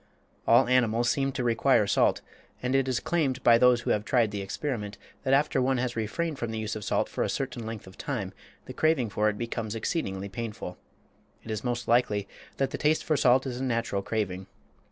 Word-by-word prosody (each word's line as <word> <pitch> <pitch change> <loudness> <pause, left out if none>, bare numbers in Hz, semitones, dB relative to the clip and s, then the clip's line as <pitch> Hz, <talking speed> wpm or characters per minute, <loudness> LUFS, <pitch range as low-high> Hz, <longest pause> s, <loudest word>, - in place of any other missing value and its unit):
All - - +6
animals 120 -1 +3
seem 135 -1 0
to 130 - -2
require 115 -2 +3
salt, - - +2 0.4
and 125 +1 0
it 135 -1 +2
is 130 -2 0
claimed 140 -6 -1
by 115 -1 +6
those 125 -1 +5
who - - -1
have 105 - +1
tried 115 -2 +2
the 100 -1 -3
experiment 105 0 -4 0.2
that 135 0 +3
after 140 -1 +2
one 130 +1 +2
has 125 0 -2
refrained 140 +8 -2
from 120 - -2
the 110 - -4
use 110 0 -3
of 110 - -6
salt - - 0
for - - -2
a - - -1
certain 120 -4 -3
length 110 -2 -6
of 95 +1 -15
time 115 -10 -3 0.3
the - - -8
craving 155 -9 +1
for 105 +1 +2
it 105 - -4
becomes 115 -1 -4
exceedingly 100 - -2
painful. 105 -3 -6 0.6
It 110 - -7
is 110 - -3
most 120 -2 -2
likely 110 -4 +2 0.3
that 135 - 0
the - - -4
taste 155 +1 +2
for 155 - +1
salt 130 -1 +4
is 125 -2 -4
a - - -3
natural 115 -5 -1
craving. 95 -3 -3
120 Hz, 215 wpm, -28 LUFS, 105-130 Hz, 0.6 s, All